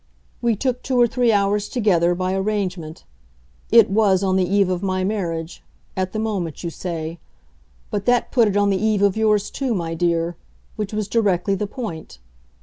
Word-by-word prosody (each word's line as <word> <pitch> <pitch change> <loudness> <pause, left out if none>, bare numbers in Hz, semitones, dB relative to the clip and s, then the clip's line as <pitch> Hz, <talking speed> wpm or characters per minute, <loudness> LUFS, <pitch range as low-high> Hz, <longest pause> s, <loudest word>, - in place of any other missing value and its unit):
We 235 -2 +2
took 250 +3 -2
two 255 -2 0
or 240 - +7
three 240 0 +1
hours 205 0 +1
together, 175 -8 +2
by 185 +1 -1
arrangement; 190 -5 -3 0.7
it 230 -3 +6
WAS 200 -2 +3
on 190 -1 +1
the 185 -2 +1
eve 200 -1 +3
of 180 -1 -2
my 185 -1 -1
marriage 170 -5 -3 0.3
at 185 -1 -2
the - - -4
moment 195 -9 -3
you 170 - -3
say. 165 -1 -5 0.7
But 205 -2 -2
that 245 -1 +2
put 235 -4 +4
it 205 0 0
on 205 0 +3
the 195 +1 -1
eve 215 -2 +2
of 200 -2 +3
yours 215 -2 +1
too, 260 -5 -2
my 165 -3 -3
dear 170 0 0 0.4
which 210 -2 -4
was 210 -2 -2
directly 200 -3 +1
the 205 +2 -2
point. 195 - -7
200 Hz, 185 wpm, -21 LUFS, 180-215 Hz, 0.7 s, or